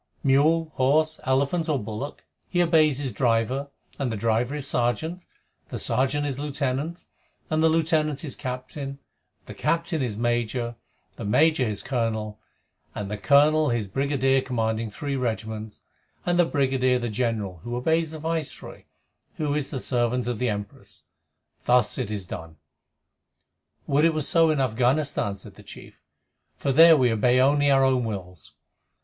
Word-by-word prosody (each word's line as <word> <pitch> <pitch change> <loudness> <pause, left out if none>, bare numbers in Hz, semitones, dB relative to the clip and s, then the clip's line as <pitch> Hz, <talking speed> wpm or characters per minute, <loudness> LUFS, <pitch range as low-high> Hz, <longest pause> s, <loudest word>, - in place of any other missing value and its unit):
Mule, 155 +4 +3
horse, 155 +4 +2
elephant, 140 +6 +1
or 150 - +2
bullock, 115 +5 -6 0.3
he 175 - 0
obeys 155 -4 +3
his 135 -3 -3
driver, 120 +4 0 0.3
and 135 -4 -1
the 110 - -3
driver 115 +5 0
his 145 -2 -4
sergeant, 125 +10 -1 0.5
and - - -38
the - - -5
sergeant 135 +3 0
his 140 -2 -3
lieutenant, 145 +3 -3 0.5
and 155 0 +2
the 160 - +5
lieutenant 155 -2 +1
his 145 -6 -5
captain, 130 +2 -5
and - - -36 0.5
the - - -9
captain 165 -2 -1
his 115 -5 -2
major, 120 0 -1
and 120 - -11 0.4
the 115 - -6
major 150 +6 +3
his 105 -3 -3
colonel, 110 -4 -2 0.6
and 100 -1 -5
the 105 - -3
colonel 150 +5 +4
his 120 -4 -1
brigadier 135 +3 +1
commanding 115 -3 -2
three 140 +6 -4
regiments, 110 -3 -4 0.4
and 175 0 +1
the 175 - +6
brigadier 130 -3 +1
the 120 -1 -3
general, 110 -5 -2
who 120 0 -4
obeys 160 +6 +1
the 160 - -7
Viceroy, 160 -1 -5 0.5
who 150 -2 -1
is 150 -2 -2
the 140 - -4
servant 125 -1 0
of 120 -2 -3
the 125 -1 +1
Empress. 105 -1 -7 0.6
Thus 125 -2 +3
it - - -2
is 105 -3 -4
done." 80 -3 -8 1.3
"Would 145 +3 +3
it 165 -1 +3
were 155 - 0
so 165 +2 +3
in 155 -2 +1
Afghanistan!" 130 -2 +1
said 100 - -12
the - - -15
chief, - - -13 0.5
"for 140 - -1
there 165 +3 +8
we 125 -3 +3
obey 120 +3 +3
only 145 +2 +4
our 135 -1 +4
own 130 -2 +2
wills." 90 -7 -7
130 Hz, 165 wpm, -25 LUFS, 115-150 Hz, 1.3 s, there